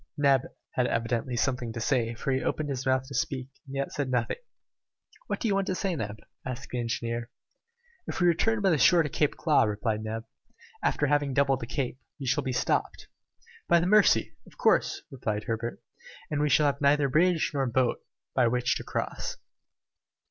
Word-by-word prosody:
Neb 140 -3 +3 0.2
had 125 -1 +1
evidently 115 +2 -1
something 125 -2 0
to 120 - -5
say, 115 -1 0
for 135 - -2
he 130 0 +1
opened 150 +3 -1
his 135 -1 -3
mouth 130 0 +2
to 140 - -9
speak 130 -1 -2 0.2
and 135 - -7
yet 140 0 -2
said 140 -3 -2
nothing. 125 -2 0 0.9
"What - - -2
do 235 - -1
you 205 - +2
want 195 -1 0
to 185 - 0
say, 190 -2 -1
Neb?" 105 -6 -4 0.3
asked 130 +1 -6
the 125 - -2
engineer. 115 0 -2 0.8
"If - - -4
we 180 - +3
return 210 +6 +2
by 190 - +4
the 155 - +2
shore 170 +4 +6
to 150 - -3
Claw 150 +1 +2
Cape," 110 - +1
replied 105 +1 -1
Neb, 110 +1 -4 0.6
"after 150 - +2
having 145 -2 +1
doubled 135 -2 +3
the 115 - -6
Cape, 130 0 -3 0.2
we 135 - -5
shall 140 +3 +2
be 130 - -2
stopped 125 - -1 0.3
" - - -25
"By 170 - +6
the 170 - 0
Mercy! 180 - +4
of - - -18
course," - - +2
replied 110 -5 -3
Herbert, 115 +1 -3 0.5
"and 150 -1 0
we 150 - +2
shall 150 - +4
have 140 0 +1
neither 140 0 +4
bridge 165 +4 +2
nor 135 -2 0
boat 125 +1 +1 0.3
by 125 - +3
which 125 +1 +1
to - - -7
cross." - - -3
130 Hz, 200 wpm, -28 LUFS, 120-145 Hz, 0.9 s, shore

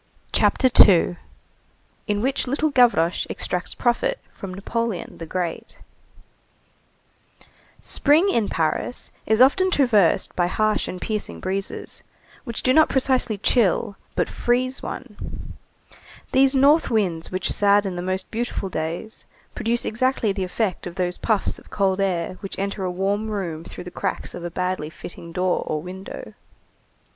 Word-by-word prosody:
CHAPTER 260 - +3 0.2
II—IN 195 +3 -2
WHICH 265 0 0
LITTLE 290 +4 0
GAVROCHE 235 -10 +3
EXTRACTS 180 - -2
PROFIT - - +1
FROM 195 - -8
NAPOLEON 215 +1 -3
THE 165 - -6
GREAT 175 -1 -4 2.1
Spring 305 +6 +3
in 230 - +1
Paris 165 +9 -1 0.2
is 220 +1 +3
often 330 +9 +5
traversed 235 - +3
by 175 -1 +2
harsh 215 +3 +1
and 180 - -5
piercing 210 - -3
breezes 195 - -4 0.4
which 235 -3 -5
do 255 - +4
not 315 +2 +5
precisely 255 -4 +1
chill 205 -2 +2 0.2
but - - +1
freeze 255 +2 0
one; 210 -6 -8 0.8
these 270 +1 +4
north 285 +4 +5
winds 185 -8 0
which 185 0 0
sadden 200 -2 +3
the 175 - -3
most 185 +1 -3
beautiful 230 -4 -3
days 165 +6 -5 0.3
produce 235 +1 -1
exactly 240 -1 +1
the 195 -1 -2
effect 185 0 -2
of 175 - -8
those 180 -1 -1
puffs 220 -3 0
of - - -19
cold 195 -1 +1
air 185 -2 -1
which 195 - -5
enter 200 0 -3
a 185 - -1
warm 200 +4 -1
room 175 -6 -3
through - - -9
the 180 - -9
cracks - - -3
of 175 - -7
a 175 - -3
badly 180 -3 -2
fitting 170 +1 -10
door 180 +1 0
or 155 - -1
window. 185 +4 -8
200 Hz, 140 wpm, -23 LUFS, 180-240 Hz, 2.1 s, often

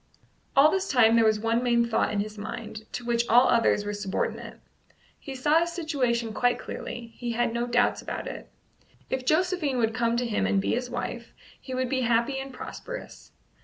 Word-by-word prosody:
All 290 +3 +7
this 385 0 -1
time 230 -3 +5
there 230 - +5
was 215 -1 +3
one 230 +2 +1
main 235 -1 +3
thought 235 - +1
in 205 -1 0
his 215 +1 -6
mind, 220 0 -7
to 245 - -5
which 235 0 +1
all 245 +3 +6
others 225 -3 +3
were 205 - -3
subordinate. 205 -2 -3 0.6
He 275 - -8
saw 295 +5 +3
his 340 0 -1
situation 250 -9 -1
quite 245 +3 +2
clearly; 235 -1 -7
he 240 -1 -3
had 240 0 0
no 235 +1 -1
doubts 245 0 +2
about - - -5
it. - - -7 0.6
If 260 -1 -2
Josephine 315 -4 +1
would 225 -2 +1
come 235 0 +1
to 245 - 0
him 225 -3 0
and 200 - +2
be - - 0
his 250 +1 -2
wife, 240 -1 -5 0.3
he 260 - -6
would 255 0 0
be 260 0 0
happy 240 +3 +1
and 270 0 -6
prosperous. - - -8
240 Hz, 200 wpm, -27 LUFS, 230-260 Hz, 0.6 s, All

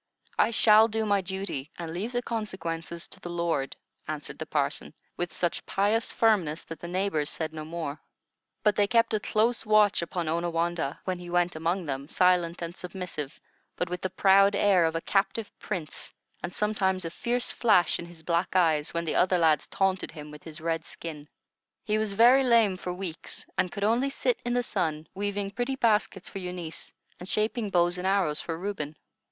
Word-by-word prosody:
I - - +5
shall 220 -1 +6
do 220 0 -1
my 200 -2 +2
duty, 190 -7 -4
and 165 -2 -5
leave 200 +7 -3
the 245 0 -1
consequences 170 -7 -4
to - - -11
the 175 - -7
Lord," 170 -6 -1 0.3
answered - - -5
the - - -5
parson, - - -1 0.2
with 175 -1 -3
such 170 +2 -1
pious 210 +4 +1
firmness 185 -9 +2
that 165 -2 -9
the 170 - -7
neighbors 180 -5 0
said 160 -1 -4
no 155 -1 -5
more. 155 -2 -5 0.6
But 210 -1 +4
they 205 -1 +3
kept 230 0 +3
a 215 - +2
close 225 +3 +1
watch 215 -3 +4
upon 170 0 -3
Onawandah, 170 -2 -1
when 185 -1 -2
he 175 0 -8
went 175 0 +1
among 170 +3 -1
them, 140 0 -4
silent 175 -2 +2
and 170 +1 -5
submissive, 180 -6 -6 0.4
but 180 -1 -2
with 180 - -3
the 185 - -1
proud 195 +2 +5
air 195 -4 +4
of 160 0 0
a 165 - -1
captive 195 +3 0
prince, 175 -7 -5 0.3
and 175 - -4
sometimes 190 -3 0
a 165 - -4
fierce 240 +6 -1
flash 210 -7 +3
in 170 - -6
his 170 -2 -13
black 170 +2 0
eyes 160 -4 +2
when 170 0 -1
the 160 - -1
other 185 0 +3
lads 160 -4 +3
taunted 190 -1 0
him 150 -2 -9
with 150 0 -11
his 160 0 -9
red 165 0 -1
skin. 155 -3 -8 0.5
He 215 0 +1
was 215 -2 -1
very 245 +6 +6
lame 230 -6 +4
for 180 0 -5
weeks, 180 -3 -6
and 180 - +1
could 200 - -4
only 235 +6 +2
sit 475 - 0
in 240 0 -1
the 245 - +2
sun, 160 -7 -1
weaving 200 0 -2
pretty 245 +5 -2
baskets 210 -6 +1
for 195 - -6
Eunice, 180 -3 -6 0.3
and 180 - -8
shaping 215 0 0
bows 175 -1 +2
and 185 - -1
arrows 190 -6 +2
for 165 -1 -4
Reuben. 170 -5 -4
180 Hz, 190 wpm, -28 LUFS, 165-210 Hz, 0.6 s, shall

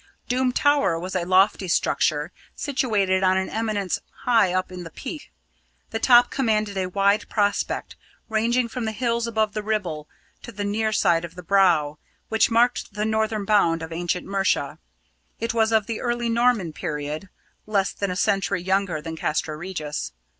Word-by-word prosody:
Doom 255 0 +1
Tower 285 - +2
was 185 +2 -6
a 175 -2 0
lofty 190 +1 +3
structure, 155 -2 +1 0.2
situated 210 -9 0
on 185 0 +3
an 190 - -2
eminence 215 -4 -1 0.2
high 225 -7 +4
up 185 0 -1
in 180 -1 -7
the 165 - -8
Peak. - - -8 0.6
The 225 - -2
top 245 0 +6
commanded 215 -6 0
a 190 -1 -1
wide 200 +2 +1
prospect, 205 -2 -1 0.3
ranging 235 +2 +1
from 235 0 -4
the 220 - -2
hills 235 0 -1
above 220 -2 0
the 215 - -2
Ribble 185 -8 -3 0.3
to - - -9
the 205 -2 -5
near 215 +2 0
side 175 -6 +2
of 170 - -8
the 180 - -9
Brow, 170 -6 +3 0.3
which 220 0 +3
marked 235 -2 +1
the 210 +1 -1
northern 220 -1 0
bound 170 -6 +3
of 160 - -7
ancient 175 +2 -2
Mercia. 190 -7 0 0.6
It 230 +1 -2
was 225 -1 +2
of 220 -2 +3
the 225 0 -4
early 240 -1 -1
Norman 230 -8 +2
period, 150 +2 -4 0.4
less 200 -2 +1
than 200 - -3
a 180 - -2
century 195 -3 0
younger 190 -4 0
than 165 0 -5
Castra 155 0 -2
Regis. 155 -3 -5
200 Hz, 170 wpm, -24 LUFS, 175-225 Hz, 0.6 s, top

